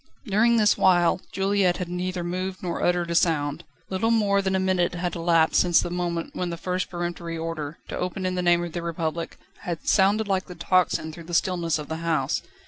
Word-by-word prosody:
During 230 +2 +3
this 210 -2 +3
while, 175 -1 +4
Juliette 195 -2 +1
had 180 - -4
neither 180 0 -3
moved 185 +2 -4
nor 175 -2 -3
uttered 175 -1 +1
a - - 0
sound. 155 -2 +1 0.3
Little 190 +4 0
more 205 -3 +3
than 190 -1 0
a - - +2
minute 185 -2 +1
had 175 0 -2
elapsed 165 -1 +3
since 175 -2 +4
the 175 - -2
moment 175 -1 -3
when 180 - -2
the 170 - -4
first 180 +1 -2
peremptory 175 -1 -4
order, 160 -2 -4
to - - -5
open 180 +1 -3
in 185 - 0
the 180 - -1
name 175 -1 +3
of 170 - -5
the 175 - -4
Republic, 165 -1 -3 0.2
had 170 -2 -5
sounded 205 +2 +3
like 190 -1 0
the 180 - -9
tocsin 175 -2 +1
through 170 0 -10
the 175 0 -3
stillness 170 -3 +1
of 150 -1 -7
the 160 - -4
house. 160 -4 0
175 Hz, 215 wpm, -25 LUFS, 170-185 Hz, 0.3 s, while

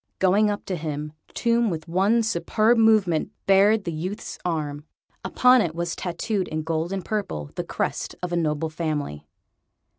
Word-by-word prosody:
Going 200 +3 +3
up 205 0 -3
to 185 - -2
him, 150 -1 -4 0.2
Tomb, 235 -1 +2
with 160 -2 -5
one 195 +7 +2
superb 220 +3 +2
movement, 210 -8 +3 0.2
bared 200 +2 +5
the 170 - -3
youth's 185 +7 -5
arm. 150 -4 -2 0.4
Upon 250 0 +5
it 165 -6 -2
was 170 0 -2
tattooed, 190 +2 -2
in 155 0 -3
gold 165 +2 -2
and 195 -2 -3
purple, 135 - -3
the - - -3
crest - - -3
of 175 -1 -3
a - - +2
noble 160 -1 -1
family. 150 - -3
175 Hz, 160 wpm, -24 LUFS, 155-210 Hz, 0.4 s, bared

